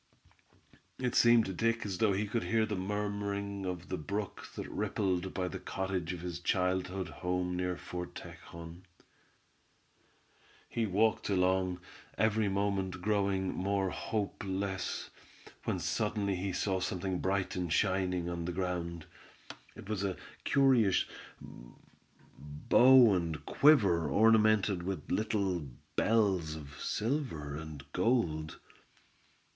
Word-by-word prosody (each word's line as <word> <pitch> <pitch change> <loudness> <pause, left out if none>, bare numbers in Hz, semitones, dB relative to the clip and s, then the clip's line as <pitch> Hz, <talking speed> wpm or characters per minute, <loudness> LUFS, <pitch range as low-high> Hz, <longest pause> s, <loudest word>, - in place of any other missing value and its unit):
It 125 -1 -1
seemed 120 -2 +6
to 95 - -4
Dick 115 +4 0
as 95 -3 -4
though 110 -2 +4
he 100 +3 0
could 110 +3 -2
hear 115 -1 +2
the 110 -1 -3
murmuring 100 0 -3
of 90 -1 -5
the 95 - -2
brook 100 +6 -4
that - - -5
rippled 95 -2 -1
by 90 -1 -2
the - - -5
cottage 95 -3 -3
of 90 -2 -6
his 85 -1 -5
childhood 90 +1 0
home, 90 0 -2
near 90 0 -1
Fort 90 0 -6
Tejon. 85 +1 -10 1.9
He 115 -2 -1
walked 105 +4 +2
along, 90 -1 +1 0.4
every 110 0 +2
moment 95 -2 -1
growing 100 -2 +1
more 95 0 0
hopeless, 100 -3 -3 0.5
when - - 0
suddenly 105 -2 -1
he 95 +2 -2
saw 95 +1 0
something 90 0 -2
bright 95 0 -1
and 90 -3 -2
shining 90 -1 +1
on 85 -1 -3
the 90 - -2
ground. 85 -2 -3 0.7
It - - -11
was 105 -2 -2
a 95 -2 -1 0.3
curious 130 -8 +4 0.3
bow 105 - +2
and 85 -5 -2
quiver 100 - +4
ornamented 110 0 +4
with 95 +1 -4
little 100 -4 0 0.4
bells 95 -8 +2
of 70 -3 -10
silver 110 - -2
and 75 -2 -8
gold. 90 -7 0
95 Hz, 120 wpm, -32 LUFS, 90-105 Hz, 1.9 s, seemed